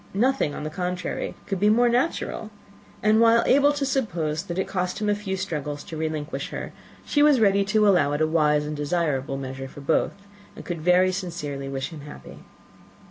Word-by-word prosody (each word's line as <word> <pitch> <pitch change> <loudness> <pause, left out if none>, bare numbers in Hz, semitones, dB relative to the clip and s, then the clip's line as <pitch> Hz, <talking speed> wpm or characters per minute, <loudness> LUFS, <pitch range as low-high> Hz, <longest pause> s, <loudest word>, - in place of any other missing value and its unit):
Nothing, 245 - +1
on - - -6
the 155 - -4
contrary, 180 +1 -3
could 195 -2 -3
be 210 +2 +4
more 240 +3 +4
natural; 240 -3 -1 0.5
and, 215 +1 +4
while 230 0 +5
able 285 +2 +5
to 290 -1 -1
suppose 175 - -1
that 175 -2 -6
it 190 - -1
cost 180 0 -2
him 210 -1 0
a - - +4
few 205 -2 -3
struggles 150 -6 -4
to 160 - -8
relinquish 155 -1 -3
her, - - -6 0.3
she 290 - +1
was 295 -3 +5
ready 200 -2 +4
to 210 +1 +3
allow 175 -8 +4
it 145 - -1
a - - +5
wise 150 -2 +2
and 150 0 -4
desirable 145 -3 -1
measure 135 0 -6
for 145 - -11
both, 140 +3 +1 0.4
and - - -10
could 170 -3 -4
very 180 +2 +4
sincerely 155 -7 -5
wish 135 -1 -3
him 160 -4 -9
happy. 145 +1 -11
180 Hz, 195 wpm, -24 LUFS, 150-210 Hz, 0.5 s, while